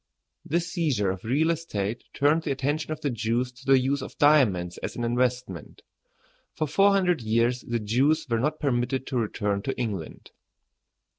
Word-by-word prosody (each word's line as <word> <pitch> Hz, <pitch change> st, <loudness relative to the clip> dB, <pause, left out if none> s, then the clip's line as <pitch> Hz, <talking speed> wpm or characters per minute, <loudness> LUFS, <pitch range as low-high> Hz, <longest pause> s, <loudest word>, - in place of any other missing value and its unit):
This 170 Hz, +3 st, -1 dB
seizure 130 Hz, -, +1 dB
of 95 Hz, 0 st, -7 dB
real 145 Hz, +8 st, +2 dB
estate 120 Hz, -10 st, -3 dB
turned 150 Hz, +3 st, +2 dB
the 160 Hz, -, -5 dB
attention 145 Hz, +4 st, -2 dB
of 155 Hz, -, -4 dB
the 145 Hz, -, -1 dB
Jews 115 Hz, +2 st, -1 dB
to 130 Hz, +2 st, -17 dB
the 135 Hz, 0 st, +6 dB
use 135 Hz, +2 st, 0 dB
of -, -, -9 dB
diamonds 110 Hz, -, +3 dB
as -, -, -5 dB
an 120 Hz, -, -3 dB
investment. 120 Hz, -7 st, -2 dB, 0.7 s
For 155 Hz, -, -1 dB
four 195 Hz, +7 st, +4 dB
hundred 185 Hz, -6 st, +2 dB
years 115 Hz, +2 st, +1 dB
the 120 Hz, -, -2 dB
Jews 130 Hz, +9 st, +1 dB
were 115 Hz, -2 st, 0 dB
not 150 Hz, +5 st, -1 dB
permitted 130 Hz, -1 st, 0 dB
to 130 Hz, -, -3 dB
return 105 Hz, -2 st, -1 dB
to 135 Hz, -, -4 dB
England. 105 Hz, -10 st, -5 dB
125 Hz, 170 wpm, -26 LUFS, 115-150 Hz, 0.7 s, the